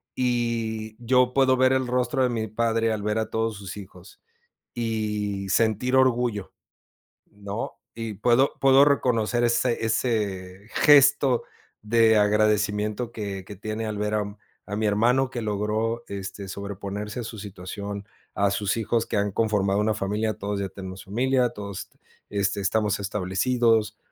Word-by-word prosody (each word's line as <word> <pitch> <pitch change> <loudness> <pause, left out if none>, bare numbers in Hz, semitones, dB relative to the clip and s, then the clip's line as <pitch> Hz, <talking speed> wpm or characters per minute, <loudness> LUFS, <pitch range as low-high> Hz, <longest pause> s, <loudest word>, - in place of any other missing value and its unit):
Y 115 -3 -1
yo 125 +1 +3
puedo 130 -1 +4
ver 130 0 +4
el 130 -1 +1
rostro 125 +2 +1
de 125 - +2
mi 115 -2 -2
padre 115 +1 0
al 110 -1 -2
ver 105 +1 0
a 110 - -2
todos 110 0 -1
sus 100 0 -8
hijos 95 -2 -12 0.6
y 105 -4 -2
sentir 115 +4 +1
orgullo, 125 -6 +1 0.8
¿no? 100 +3 -6 0.2
Y 115 -2 -4
puedo 120 +6 +3
puedo 135 +1 +6
reconocer 120 -4 +1
ese 120 0 +1
ese 100 -4 -2
gesto 140 -3 +5 0.4
de 110 0 +4
agradecimiento 105 +2 +1
que 100 -4 -5
que 100 - -9
tiene 110 +3 -4
al 105 -1 -3
ver 105 +1 -1
a 105 -1 +1 0.4
a 105 - -4
mi 110 +1 -1
hermano 120 +6 +2
que 120 - -4
logró, 110 +2 -1
este, 100 0 -6
sobreponerse 100 +3 -5
a - - -5
su 110 -1 -7
situación, 100 +1 -7 0.3
a 100 0 +2
sus 100 +2 -1
hijos 115 +1 0
que - - -1
han 100 0 0
conformado 100 -2 +1
una 105 0 +1
familia, 105 +2 -1
todos 100 -1 -3
ya 100 -1 -3
tenemos 95 0 -8
familia, 125 +5 +1
todos, 100 -4 -7 0.4
este, 100 -1 -1
estamos 105 +1 +1
establecidos 105 +4 +1
110 Hz, 150 wpm, -25 LUFS, 100-120 Hz, 0.8 s, puedo